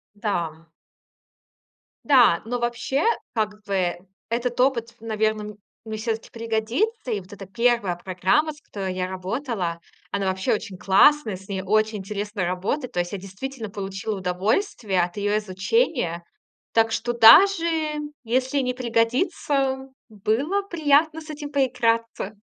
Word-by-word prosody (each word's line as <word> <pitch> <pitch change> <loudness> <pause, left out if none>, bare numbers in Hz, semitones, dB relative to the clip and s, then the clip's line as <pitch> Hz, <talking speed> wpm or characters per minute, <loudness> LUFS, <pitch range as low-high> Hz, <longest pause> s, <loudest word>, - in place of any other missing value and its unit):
Да. 170 -6 -3 1.4
Да, 245 - +5
но 245 +2 -2
вообще, 240 +4 -1 0.3
как 215 -2 -2
бы 185 -3 0 0.3
этот 240 +1 -2
опыт, 235 -3 +1
наверно, 215 -1 -1 0.3
мне 220 -1 -5
всё-таки 225 0 -3
пригодится. 230 - -1
И 210 - 0
вот 185 +1 -13
эта 195 -2 -9
1 235 -3 +1
программа, 190 - +1
с 300 - -19
которой 190 -7 -5
я 185 0 -2
работала, 190 -1 -3 0.3
она 200 -1 -1
вообще 190 +6 0
очень 200 -3 -4
классная, 215 +5 +4
с 190 +1 -13
ней 190 -1 -3
очень 215 +2 +1
интересно 205 0 -3
работает. 195 - -2
То 180 - -1
есть 175 0 -1
я 200 - -3
действительно 215 +5 -7
получила 195 +1 -4
удовольствие 190 - 0
от 175 +2 -3
её 205 0 0
изучения. 190 - 0 0.5
Так 225 0 +3
что 240 +2 -1
даже 330 - +8 0.6
если 255 +4 0
не 250 -2 0
пригодится, 265 +3 0 0.2
было 225 - 0
приятно 315 -3 +2
с 310 - -13
этим 290 -1 -7
поиграться. 230 -6 0
220 Hz, 135 wpm, -24 LUFS, 195-260 Hz, 1.4 s, даже